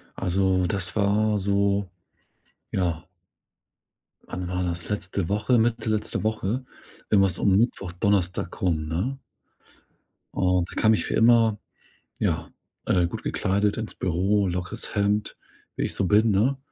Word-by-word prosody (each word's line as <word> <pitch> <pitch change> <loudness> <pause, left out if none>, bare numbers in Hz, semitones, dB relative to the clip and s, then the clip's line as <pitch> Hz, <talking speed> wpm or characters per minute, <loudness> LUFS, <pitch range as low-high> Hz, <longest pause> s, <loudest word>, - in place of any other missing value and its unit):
Also, 95 0 +1
das 95 -3 -2
war 105 +1 +2
so 100 0 +1 0.8
ja. 85 -3 -1 1.3
Wann 90 0 -5
war 90 0 -2
das? 85 -1 -4
Letzte 95 -3 -2
Woche, 105 +5 +2
Mitte 115 0 +1
letzte 110 -1 -1
Woche 110 +3 -1 0.4
wenn 100 - +4
war's 95 -3 +1
um 95 -2 +3
Mittwoch, 100 -5 0
Donnerstag 90 -1 -1
rum, 80 -4 0
ne? 95 - -2 1.2
Und 90 -1 +1
da - - -4
kam 110 -1 +5
ich - - -2
wie - - -1
immer, 115 -2 +4 0.6
ja, - - -1 0.4
äh, 90 -2 +3
gut - - -6
gekleidet 100 +2 0
ins 110 -1 -5
Büro, 95 +3 +1
lockeres 90 +1 -3
Hemd, 105 0 0 0.4
wie - - -1
ich - - -3
so 95 - 0
bin, 110 +4 +4
ne? 115 +8 +2
100 Hz, 140 wpm, -25 LUFS, 90-105 Hz, 1.3 s, kam